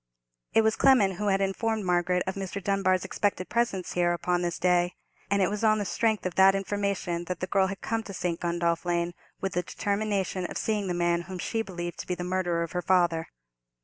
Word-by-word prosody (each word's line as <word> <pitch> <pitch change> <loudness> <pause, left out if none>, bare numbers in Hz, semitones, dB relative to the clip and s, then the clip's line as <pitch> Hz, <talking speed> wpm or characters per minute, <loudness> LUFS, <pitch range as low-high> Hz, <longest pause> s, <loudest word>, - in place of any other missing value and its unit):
It 225 - +5
was 220 0 +2
Clement 205 -9 +4
who 210 - -2
had 195 0 +2
informed 215 +2 -1
Margaret 180 0 +2
of 190 - -2
Mr. 195 0 -4
Dunbar's 190 -1 +1
expected 190 -1 -1
presence 225 -6 -1
here 175 -1 +2
upon 175 +1 0
this 175 -1 -2
day; 175 0 +2 0.3
and 200 -1 +3
it - - +3
was 210 +1 -3
on 215 -1 +4
the 205 - -2
strength 220 +1 0
of 185 - -1
that 190 +1 +6
information 195 -3 -2
that 180 -1 -4
the - - -1
girl 190 0 +2
had 195 0 -6
come 225 0 -1
to - - -7
St. 170 -2 -2
Gundolph 170 -1 0
Lane, 175 0 0 0.3
with 195 -1 -2
the 180 - +1
determination 200 -2 -1
of - - -6
seeing 210 -3 -1
the 180 - -1
man 175 0 +1
whom 185 - -5
she 225 +5 -1
believed 175 -4 -6
to - - -6
be 180 - -1
the 175 - -5
murderer 175 -2 0
of 170 - -6
her 180 - -2
father. 175 -3 +2
185 Hz, 220 wpm, -28 LUFS, 175-200 Hz, 0.3 s, that